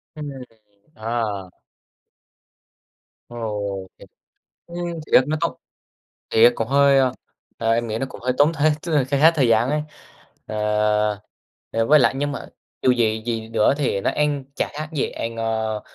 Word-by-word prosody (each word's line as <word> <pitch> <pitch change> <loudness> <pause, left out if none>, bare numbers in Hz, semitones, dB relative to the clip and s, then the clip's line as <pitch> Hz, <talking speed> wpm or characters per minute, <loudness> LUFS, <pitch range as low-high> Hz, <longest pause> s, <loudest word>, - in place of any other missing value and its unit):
Ừm. 150 -1 -6 0.7
Ờ. 110 -4 -3 1.8
Ồ, 105 -5 -4
thiệt! - - -15 0.6
Ừm, 170 - -8 0.3
thiệt 130 - +7
nó 155 +1 0
tốn. 170 - 0 0.8
Thiệt 115 +2 +6
cũng 115 0 -3
hơi, 140 0 +5
a, 130 -2 +3 0.5
à, 115 -1 0
em 115 +1 +1
nghĩ 110 +1 -2
nó 135 - -2
cũng - - -11
hơi 125 +1 0
tốn 150 +3 +5
thiệt, 155 0 +2
tức 170 - -4
là 145 -4 +3
kha 140 +1 -1
khá 160 +2 +8
thời 140 -7 +1
gian 115 +3 +3
ấy. 150 0 0 0.7
À, 110 - -5 1.2
ờ, 115 0 0
với 150 +1 +6
lại 130 - +3
nhưng 145 +1 -1
mà - - -6 0.4
dù 130 - +4
gì 110 -3 +1
gì 115 -2 -3
nữa 115 +3 +3
thì 135 -9 0
nó - - +1
ăn 145 -2 0
chả - - 0
khác 155 +1 -5
gì 150 - -1
ăn, 115 0 -5
ơ, 110 -1 -2
120 Hz, 170 wpm, -22 LUFS, 110-145 Hz, 1.8 s, khá